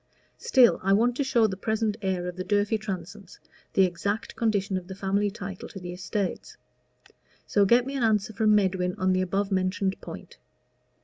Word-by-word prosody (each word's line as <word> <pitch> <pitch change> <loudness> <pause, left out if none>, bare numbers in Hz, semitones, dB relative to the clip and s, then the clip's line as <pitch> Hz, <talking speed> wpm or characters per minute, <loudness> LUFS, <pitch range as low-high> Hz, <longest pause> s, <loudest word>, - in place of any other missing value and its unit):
Still 260 - +4
I 195 +1 +2
want 235 +4 +3
to 280 - +1
show 240 -4 +3
the 195 -3 -1
present 220 +2 -1
heir 190 -3 -1
of 180 - -5
the 185 - -4
Durfey 205 +3 +1
Transomes 195 -1 -7 0.4
the 195 - +5
exact 200 +5 -2
condition 200 -4 0
of 185 -1 -4
the 190 - -7
family 200 +1 0
title 195 -3 -7
to 195 - -9
the 175 -1 -7
estates. 185 +2 -4 0.9
So 205 -1 +3
get 240 +4 +4
me 275 +1 -5
an 270 - -2
answer 220 -1 +1
from 215 -1 +3
Medwin 185 -3 +1
on 185 -1 +1
the 185 - +1
above 195 +2 -1
mentioned 190 +1 0
point. - - -10
200 Hz, 185 wpm, -26 LUFS, 185-220 Hz, 0.9 s, the